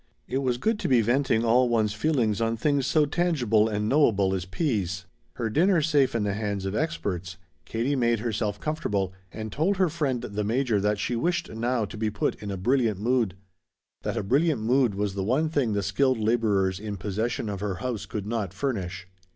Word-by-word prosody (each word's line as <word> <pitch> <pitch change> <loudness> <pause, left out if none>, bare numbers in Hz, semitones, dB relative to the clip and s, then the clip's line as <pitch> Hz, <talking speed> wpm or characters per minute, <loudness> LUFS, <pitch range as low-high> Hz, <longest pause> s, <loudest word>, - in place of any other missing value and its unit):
It 130 - -1
was 125 -3 0
good 215 - 0
to - - -2
be 125 -4 +4
venting 120 0 +2
all 120 +2 +4
one's 110 -3 +1
feeling 115 -3 +1
on 115 0 0
things 140 +1 +1
so 155 0 +3
tangible 135 -10 +2
and 105 0 -1
knowable 110 -9 +3
as 95 - -1
sweet 90 +1 -10
peas. 100 - -1 0.3
Her 115 - -2
dinner 170 - +3
safe 145 -5 +2
in 115 - +1
the 100 -1 0
hands 100 -2 -3
of 95 - -2
experts, 95 - -2 0.3
Katie 120 +6 -1
made 120 -3 +2
herself 110 -2 -2
comfortable 105 - -2 0.2
and 110 -1 -6
told 185 +7 +1
her 185 -2 +3
friend 145 -7 -1
the 105 0 -3
Major 115 -1 +1
that 105 +1 +1
she 120 +4 -1
wished 170 +10 -1
now 115 +1 0
to 110 - -9
be 110 0 0
put 100 -1 -1
in 105 - -5
a 100 - -3
brilliant 115 0 +1
mood. 115 -4 +1 0.7
That - - -3
a - - -1
brilliant 140 - +2
mood 120 -2 +2
was 100 -1 -1
the 95 0 -2
one 135 +10 +1
thing 140 -8 0
the 100 -1 0
skilled 130 +4 +2
laborers 105 -4 +1
in 105 -1 -5
possession 110 +5 -2
of 100 -2 -3
her 100 -2 -2
house 120 +1 -4
could 105 -2 -4
not 105 -4 -3
furnish. 95 -7 -3
115 Hz, 205 wpm, -26 LUFS, 100-135 Hz, 0.7 s, be